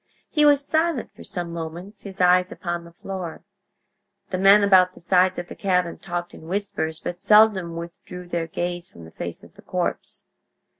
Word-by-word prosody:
He 300 -2 +4
was 285 -1 +5
silent 315 -5 0
for - - -12
some 175 -2 -5
moments, 170 +5 -6
his 195 -1 -9
eyes 180 0 +4
upon 175 -1 -4
the 170 - -13
floor. 180 -1 -6 0.9
The 185 - -1
men 200 +2 +7
about 185 -2 +5
the - - -13
sides 185 +1 +3
of 175 - -4
the - - -8
cabin 180 -3 0
talked 175 -1 -4
in 160 - -12
whispers, 190 -4 -2
but 175 0 -5
seldom 205 -5 +5
withdrew 170 +1 -8
their 170 -1 -2
gaze 175 +1 -4
from 85 - -13
the 80 - -13
face - - -7
of - - -16
the - - -16
corpse. - - -3
180 Hz, 185 wpm, -24 LUFS, 170-195 Hz, 0.9 s, men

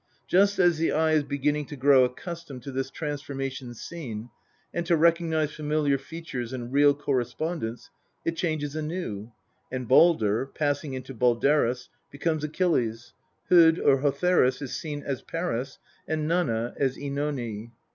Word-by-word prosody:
Just 200 +2 +4
as 175 -3 +4
the 165 - +2
eye 160 +1 +2
is 155 -1 +4
beginning 145 +1 -1
to 145 - -7
grow 135 -1 +5
accustomed 140 0 -5
to 140 - -6
this 135 0 -2
transformation 135 -4 -5
scene, 120 -6 -7 0.4
and 170 - -1
to 170 -2 +4
recognise 160 -2 +2
familiar 150 -2 0
features 135 -5 -6
and 125 0 -6
real 145 0 +5
correspondence, 130 -1 -3 0.3
it 165 - 0
changes 155 -4 -2
anew, 150 - -4 0.4
and 130 -2 -4
Baldr, 130 -4 +4
passing 145 -2 -1
into 130 +1 -7
Balderus, 125 +1 +2 0.2
becomes 155 +1 -2
Achilles; 125 -8 0 0.4
Hod 165 -2 +7
or 135 -5 +3
Hotherus 145 -2 +2
is 135 - -4
seen 145 -2 -5
as 135 -2 -3
Paris, 140 -6 -3 0.3
and 155 0 -1
Nanna 120 -9 0
as 135 -2 +1
CEnone. 140 -6 -3
145 Hz, 140 wpm, -27 LUFS, 130-160 Hz, 0.4 s, Hod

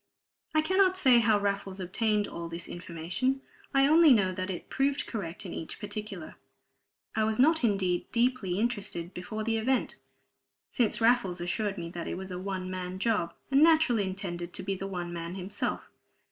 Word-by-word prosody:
I 310 - +5
cannot 375 +3 +3
say 260 -9 +6
how 220 -2 +3
Raffles 200 -1 -2
obtained 210 +3 0
all 170 0 -6
this 170 +1 -5
information. 175 +10 -2 0.3
I 275 0 +4
only 315 0 +7
know 195 -5 +3
that 185 +1 -4
it 180 - -5
proved 275 +1 0
correct 195 -3 -5
in 180 - -6
each 160 - -6
particular. 205 -4 -6 0.8
I 220 - +2
was 215 0 +1
not 320 +3 +4
indeed 190 -5 +1
deeply 235 -6 +1
interested 205 -6 -2
before 215 +5 -5
the 225 0 0
event, 255 +4 0 0.7
since 235 -2 +1
Raffles 225 -6 +3
assured 195 +4 -2
me 170 -1 -4
that 170 -1 -5
it - - -3
was 190 0 -7
"a 180 - -4
one 185 -1 -4
man 185 0 -4
job," 210 -4 0 0.2
and 275 +1 +5
naturally 310 -10 +5
intended 180 -2 -5
to - - -4
be 195 +1 -1
the 195 +1 -4
one 175 -2 -4
man 170 +1 -5
himself. 190 +1 -3
200 Hz, 175 wpm, -29 LUFS, 180-240 Hz, 0.8 s, only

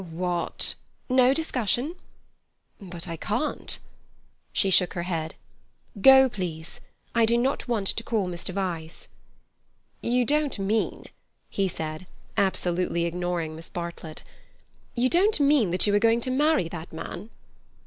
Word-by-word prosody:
"What—" 175 +1 -1 0.4
"No 255 0 +5
discussion." 270 - 0 0.9
"But 180 -3 -7
I 165 -1 -5
can't—" 240 - -2 0.7
She 195 - +1
shook 180 -1 +4
her 175 - -2
head. 165 -3 -3 0.7
"Go, 265 +3 +8
please. 175 -8 -6 0.3
I 230 -1 +4
do 235 +1 +3
not 260 +3 0
want 225 -5 0
to - - +1
call 220 -5 0
in 180 - -4
Mr. 175 +1 -3
Vyse." 175 -4 -4 0.9
"You 245 +1 +1
don't 295 0 +1
mean," 205 +3 -1 0.5
he 195 -1 +1
said, 160 0 -5 0.3
absolutely 180 -3 +1
ignoring 170 -2 -2
Miss 165 +1 -8
Bartlett—"you 170 +8 -6
don't 370 +6 +3
mean 280 -8 +4
that 180 +2 +2
you 205 - +2
are 205 - +5
going 230 +2 +3
to 255 - -1
marry 295 - +2
that 165 0 -8
man?" 175 +5 -7
195 Hz, 135 wpm, -26 LUFS, 170-245 Hz, 0.9 s, Go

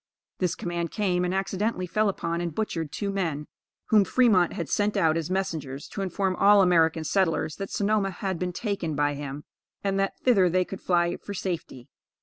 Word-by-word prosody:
This 180 -2 0
command 170 -1 -3
came, 180 -3 0
and 180 - 0
accidentally 195 +1 -1
fell 215 +4 +1
upon 170 -3 -2
and 170 -3 -4
butchered 165 -8 -2
two 200 -1 -3
men 165 -7 -2 0.4
whom 215 -2 +6
Fremont 200 -6 +3
had 170 - -4
sent 210 0 0
out 160 -5 +3
as 165 -1 -2
messengers 155 -8 -3
to - - -5
inform 190 0 -1
all 200 0 +6
American 165 -3 +3
settlers 165 -3 0
that 195 -1 -5
Sonoma 205 -1 +1
had 190 -1 -4
been 180 0 -2
taken 180 -5 -3
by 145 0 +1
him, 145 0 -6 0.4
and 195 -1 0
that 195 0 -1
thither 200 -8 +4
they 185 +1 +2
could 195 - -8
fly 175 -1 +1
for 205 - -8
safety. 165 -10 -5
185 Hz, 185 wpm, -26 LUFS, 165-195 Hz, 0.4 s, whom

